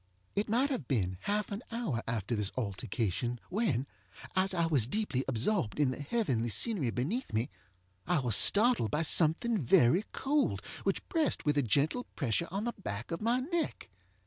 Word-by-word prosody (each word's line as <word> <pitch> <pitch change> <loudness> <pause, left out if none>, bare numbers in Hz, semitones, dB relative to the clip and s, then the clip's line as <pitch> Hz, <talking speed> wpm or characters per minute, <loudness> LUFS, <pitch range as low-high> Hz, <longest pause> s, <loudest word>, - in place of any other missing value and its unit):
It 205 +2 0
might 255 +6 +2
have 175 - -3
been 95 -8 -1
half 210 +1 -1
an 200 +2 -4
hour 230 - -2
after 115 -1 -2
this 105 -2 +1
altercation 115 +1 -2
when, 180 - 0 0.5
as 190 +1 +2
I 170 -1 +2
was 140 -9 +2
deeply 145 - -1
absorbed 135 - 0
in 140 -3 +3
the 130 - -6
heavenly 135 - -1
scenery 175 - +3
beneath 165 - -2
me, 115 +6 -1 0.6
I 175 0 +2
was 125 -7 +3
startled 210 - +5
by 150 +9 0
something 175 +9 +3
very 130 - +4
cold 285 +1 0 0.2
which - - -1
pressed 325 -4 0
with 150 -1 +2
a 145 - +3
gentle 145 - +1
pressure 140 +4 0
on 195 +4 -3
the 240 0 -2
back 100 - -5
of 165 - -3
my 235 +3 +1
neck. 335 +4 -3
155 Hz, 170 wpm, -31 LUFS, -, 0.6 s, startled